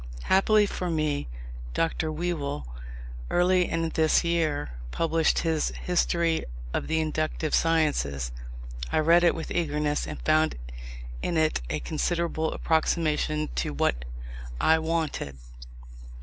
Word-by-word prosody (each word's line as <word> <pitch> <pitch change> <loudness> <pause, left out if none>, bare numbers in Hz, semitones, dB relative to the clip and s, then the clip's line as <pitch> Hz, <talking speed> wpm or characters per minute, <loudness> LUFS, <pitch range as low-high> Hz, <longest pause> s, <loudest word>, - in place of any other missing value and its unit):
Happily 210 +2 +4
for 180 -2 -3
me, 155 -3 0 0.5
Dr. 160 -1 0
Whewell, 155 - -2 0.6
early 180 0 +3
in 165 0 0
this 160 +1 +3
year, 160 - 0 0.2
published 165 - +1
his 160 -2 +1 0.2
History 170 -2 +1 0.3
of - - -1
the 160 0 +1
Inductive 155 0 -1
Sciences. 145 - +1 0.6
I - - +1
read 165 +3 +5
it 170 - +4
with 165 - -5
eagerness, 150 -3 0
and - - -6
found 155 0 +3 0.7
in 170 - -1
it 155 - +2
a 75 - -2
considerable 160 0 -1
approximation 155 -1 +1
to 75 - -1
what - - +1 0.6
I 160 0 +4
wanted. 160 - -2
160 Hz, 120 wpm, -27 LUFS, 150-170 Hz, 0.7 s, read